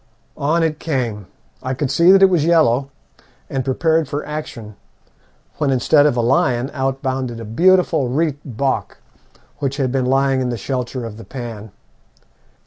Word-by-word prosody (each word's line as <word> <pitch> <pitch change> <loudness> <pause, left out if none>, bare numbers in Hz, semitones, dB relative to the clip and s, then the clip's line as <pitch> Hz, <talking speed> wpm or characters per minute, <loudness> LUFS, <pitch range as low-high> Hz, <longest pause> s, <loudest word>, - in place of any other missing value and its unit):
On 160 +4 +1
it 155 -1 -1
came. 120 - -3 0.3
I 130 +1 -3
could 130 0 -2
see 170 +5 +5
that 195 0 +6
it 195 - +7
was 170 -5 +2
yellow, 145 -6 +3 0.6
and 135 -1 -1
prepared 160 +3 +1
for 145 +1 -3
action, 125 -8 -7 0.8
when 150 -2 +1
instead 145 +3 +4
of 125 - 0
a - - +2
lion 130 0 +1
out 135 -1 -2
bounded 130 -3 -2
a 115 - -7
beautiful 165 - +3
reit 150 +2 0
bok 135 +1 -2 0.6
which 140 -1 -2
had 130 -3 0
been 130 -1 0
lying 135 0 +2
in 125 - -1
the 120 - -3
shelter 125 +2 -4
of 110 -2 -8
the 115 - -10
pan. 115 -5 -8
135 Hz, 165 wpm, -19 LUFS, 125-155 Hz, 0.8 s, it